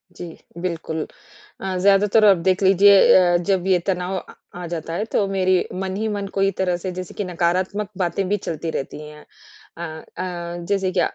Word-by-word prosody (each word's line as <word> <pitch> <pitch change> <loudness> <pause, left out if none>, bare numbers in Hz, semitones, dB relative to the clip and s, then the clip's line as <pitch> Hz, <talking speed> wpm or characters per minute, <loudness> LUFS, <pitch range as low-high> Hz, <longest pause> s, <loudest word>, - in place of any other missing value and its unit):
जी, 175 - -7 0.3
बिल्कुल। 165 -3 -3 0.6
अ, 190 -1 -3
ज़्यादातर 200 +3 +4
आप 200 -2 +7
देख 185 +1 +2
लीजिए 195 +1 +6 0.2
अ, 175 -2 +4
जब 185 +1 0
ये 185 -2 +4
तनाव 185 0 -1
अ, - - -11 0.2
आ 180 0 -6
जाता 165 -1 -5
है 205 - -1
तो 200 - +2
मेरी 185 -1 +2
मन 190 0 -3
ही 220 +2 -1
मन 205 -2 -3
को 195 - +1
एक 195 -1 +1
तरह 180 -2 +1
से 180 +2 -5
जैसे 180 0 -7
कि 205 - -3
नकारात्मक 185 +3 -1
बातें 185 +1 -1
भी 205 - +2
चलती 165 -4 -4
रहती 140 0 -5
हैं। 150 0 -13 0.5
अ - - -6 0.4
अ, 175 -1 -5
जैसे 195 -2 +1
कि - - +5
185 Hz, 195 wpm, -21 LUFS, 175-195 Hz, 0.6 s, आप